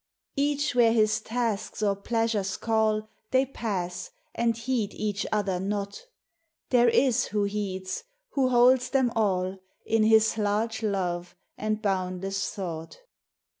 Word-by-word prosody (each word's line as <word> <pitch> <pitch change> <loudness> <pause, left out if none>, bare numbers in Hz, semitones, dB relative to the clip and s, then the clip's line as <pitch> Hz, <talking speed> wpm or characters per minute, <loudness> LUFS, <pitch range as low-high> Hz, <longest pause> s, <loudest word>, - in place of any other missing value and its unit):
Each 290 0 +1
where 235 -2 +5
his 215 -2 +3
tasks 225 -3 -2
or 200 -1 +2
pleasures 215 -2 -1
call, 220 -1 +1 0.2
They 260 +1 +3
pass, 185 -8 -4 0.2
and 230 -1 +1
heed 230 -3 -2
each 205 -1 -2
other 200 -4 0
not. 200 - -4 0.6
There 240 -1 +5
is 250 0 +3
who 210 -1 -1
heeds, 200 - -3 0.3
who 265 -2 +2
holds 250 0 +5
them 265 -3 +2
all 190 -3 0 0.3
In 225 0 +2
His 220 0 +4
large 215 +2 0
love 180 -4 -2 0.2
and 215 0 -2
boundless 190 0 -1
thought. 165 -4 -6
215 Hz, 130 wpm, -27 LUFS, 195-235 Hz, 0.6 s, where